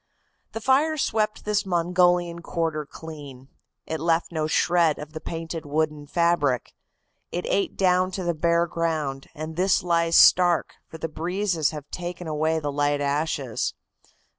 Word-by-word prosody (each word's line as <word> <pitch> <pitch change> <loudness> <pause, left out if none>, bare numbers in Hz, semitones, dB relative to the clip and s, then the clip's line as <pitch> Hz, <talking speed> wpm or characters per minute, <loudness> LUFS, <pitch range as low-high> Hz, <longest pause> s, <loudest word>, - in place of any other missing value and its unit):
"The 225 - -5
fire 290 +6 +3
swept 215 -6 -1
this 210 -1 +1
Mongolian 175 -1 +2
quarter 160 -3 -2
clean. 145 -6 -10 0.4
It 160 - -4
left 165 +2 +1
no 155 -2 -1
shred 170 -1 +2
of 150 +1 -9
the 155 - -6
painted 165 -1 -5
wooden 150 0 -2
fabric. 160 -6 +1 0.6
It 175 - -3
ate 200 - 0
down 185 -1 +3
to 190 - -3
the 175 -1 0
bare 170 +1 +2
ground, 155 -5 -2
and 155 +1 -6
this 185 0 +2
lies 170 -1 +2
stark, 175 -2 +5
for 160 - -10
the 165 - -3
breezes 170 0 -1
have 150 -2 -8
taken 175 0 -5
away 160 +1 0
the 145 -2 -3
light 145 0 +1
ashes. 140 -4 -1
165 Hz, 150 wpm, -25 LUFS, 150-175 Hz, 0.6 s, stark